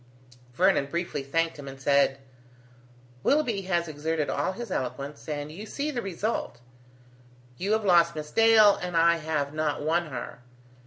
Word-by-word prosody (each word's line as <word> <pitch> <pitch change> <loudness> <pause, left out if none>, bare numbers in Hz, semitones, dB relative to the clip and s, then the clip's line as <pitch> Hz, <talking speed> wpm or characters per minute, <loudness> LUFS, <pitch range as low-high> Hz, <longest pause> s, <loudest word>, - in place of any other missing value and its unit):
Vernon 180 -4 +3
briefly 170 -1 -3
thanked 165 +3 -1
him, 140 - -9
and 135 0 -9
said: 140 -1 +3 1.0
"Willoughby 245 - +1
has 170 -2 +1
exerted 155 0 -2
all 185 - -1
his 235 +4 -7
eloquence, 140 +4 -4
and 145 0 -4
you 205 +7 -9
see 290 +6 -3
the 245 -4 -3
result: 195 - -3 1.0
you 200 +4 0
have 220 -1 0
lost 170 -3 +4
Miss 150 -1 -6
Dale 225 -2 +6
and 180 -1 -2
I 170 0 +5
have 155 -3 -2
not 155 -2 -1
won 165 +2 +1
her. 130 -3 -7
165 Hz, 155 wpm, -27 LUFS, 145-195 Hz, 1.0 s, Dale